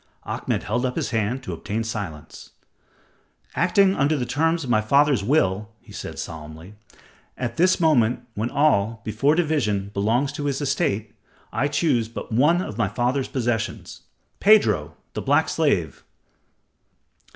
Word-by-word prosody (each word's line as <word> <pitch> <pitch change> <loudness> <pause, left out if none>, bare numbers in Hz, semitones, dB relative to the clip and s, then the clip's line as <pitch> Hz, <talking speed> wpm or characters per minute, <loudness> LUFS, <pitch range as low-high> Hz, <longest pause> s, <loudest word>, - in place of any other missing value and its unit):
Ahmed - - -3
held 120 +4 -1
up 125 -1 -1
his - - -2
hand 115 +3 -1
to - - -5
obtain 110 +3 -3
silence. 100 -9 -7 1.0
"Acting 195 -1 +3
under 150 +2 +2
the 125 - -2
terms 160 +5 0
of 130 - -6
my 110 -2 +4
father's 140 0 +3
will," 105 -5 +1
he - - -18
said, - - -7
solemnly, 80 +3 -8 0.6
"at 120 +3 -4
this 185 +3 +3
moment 125 -8 +3
when 110 +3 -2
all, 115 -7 +1
before 125 +8 +2
division, 115 - 0
belongs 115 +8 +1
to 145 0 -5
his 140 -2 -1
estate, 135 - -1 0.4
I 130 +5 +1
choose 145 -6 +1
but 115 - -8
one 150 +10 +3
of 105 - -7
my 110 - +2
father's 125 +5 -1
possessions 120 -4 -3 0.4
Pedro, 215 +1 +4 0.2
the - - -3
black - - +2
slave." - - 0
125 Hz, 145 wpm, -23 LUFS, 110-145 Hz, 1.0 s, my